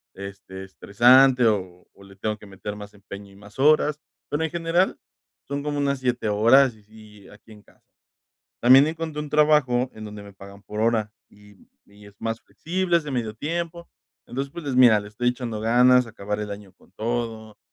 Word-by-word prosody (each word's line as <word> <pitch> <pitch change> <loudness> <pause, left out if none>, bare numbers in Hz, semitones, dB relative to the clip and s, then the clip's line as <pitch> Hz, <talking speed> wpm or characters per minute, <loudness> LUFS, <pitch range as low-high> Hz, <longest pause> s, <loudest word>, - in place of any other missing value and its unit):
este, 95 -1 -9
estresante, 125 +7 +4
o 95 -4 -2
o 100 - -18
le 95 - -16
tengo 105 +2 -3
que 105 - -15
meter 100 +1 -8
más 105 0 -10
empeño, 100 0 -11
y - - -18
más 105 +4 -16
horas, 150 +1 +3 0.3
pero, 145 +2 -2
en - - -3
general 170 +2 0 0.5
son 140 0 -3
como 145 -1 -3
unas 140 -1 0
7 125 -3 -1
horas, 115 +5 +4
y 105 - -22
sí, 105 -1 -17
aquí 105 +2 -18
en 105 -1 -15
casa. - - -27 0.8
También 130 +4 +7
encontré 160 -1 -4
un 150 -1 -7
trabajo, 150 -5 +2
en 110 - -9
donde 105 -1 -9
me 100 0 -13
pagan 100 +1 -14
por 105 - -8
hora, 110 -2 +1 0.2
y 105 -1 -21 0.2
y 100 0 -18
es 100 - -16
más 115 0 -3
flexible, 175 0 -1
es - - -8
de 145 - -6
medio 115 -4 -3
tiempo, 170 +5 -5 0.4
entonces, 135 +2 -5
pues, 170 - -8
les 135 -3 -3
mira, 120 -4 +6
le 105 - -10
estoy 120 +4 -1
echando 120 -3 -5
ganas, 125 +2 +4
acabar 105 -2 -5
el 105 -1 -5
año 100 -2 -11
con - - -26
todo, 110 -1 -4
115 Hz, 195 wpm, -23 LUFS, 105-140 Hz, 0.8 s, También